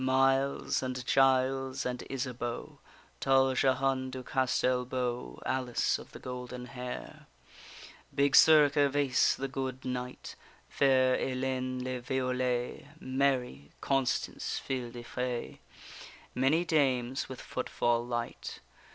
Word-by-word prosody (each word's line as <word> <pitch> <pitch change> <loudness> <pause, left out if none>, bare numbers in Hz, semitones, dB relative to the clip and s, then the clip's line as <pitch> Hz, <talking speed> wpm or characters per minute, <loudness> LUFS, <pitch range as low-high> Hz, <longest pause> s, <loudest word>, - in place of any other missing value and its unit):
Miles 135 +1 +2
and 130 -1 -4
Giles 135 0 +2
and 125 0 -2
Isabeau, 125 -3 -4 0.4
Tall 135 -1 +4
Jehane 130 0 +1
du 130 0 -6
Castel 125 -1 +1
beau, 125 - -3
Alice 130 -2 0
of - - -12
the - - -9
golden 125 0 -6
hair, 125 0 -7 0.9
Big 140 0 +3
Sir 155 -2 +8
Gervaise, 140 -2 +2
the 135 - -3
good 130 -1 -4
knight, 125 0 -5 0.3
Fair 130 -2 +3
Ellayne 130 -1 -2
le 130 0 -3
Violet, 125 0 -1
Mary, 130 - -1
Constance 135 -3 -1
fille 125 -3 -3
de 120 0 -9
fay, 125 0 -4 0.7
Many 140 +7 +2
dames 130 -5 +1
with 130 - -7
footfall 120 -2 -1
light. 120 -1 -4
130 Hz, 110 wpm, -31 LUFS, 125-135 Hz, 0.9 s, Sir